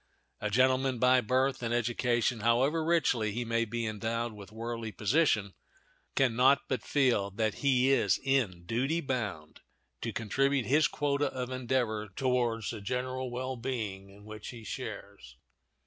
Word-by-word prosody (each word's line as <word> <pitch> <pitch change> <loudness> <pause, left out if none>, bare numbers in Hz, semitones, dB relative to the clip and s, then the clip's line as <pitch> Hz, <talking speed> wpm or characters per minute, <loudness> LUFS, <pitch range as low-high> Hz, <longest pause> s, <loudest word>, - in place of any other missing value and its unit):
A 105 - -2
gentleman 130 +3 +2
by 125 +1 +4
birth 130 +4 +1
and 120 -1 -2
education, 120 0 +1
however 130 +8 +2
richly 140 -10 +1
he 120 +2 -2
may 115 0 +1
be 115 +1 -3
endowed 115 +2 -2
with 105 -1 -11
worldly 115 0 -5
position, 105 - +1 0.6
can 130 -4 +2
not 135 +3 +5
but 130 -4 -1
feel 125 -9 +2
that 105 -1 -2
he 130 -1 +3
is 135 - +3
in 120 -11 0
duty 130 - 0
bound 110 - -4 0.4
to 115 - -2
contribute 135 +3 0
his 150 +3 +4
quota 145 0 0
of 130 -1 -4
endeavor 120 -4 -1
towards 120 -4 0
the 110 -3 -7
general 130 +3 -3
well 130 +2 -3
being 110 -6 -4
in 100 +1 -16
which 110 -1 -9
he 115 -2 -8
shares. 100 - -8
120 Hz, 150 wpm, -30 LUFS, 110-130 Hz, 0.6 s, not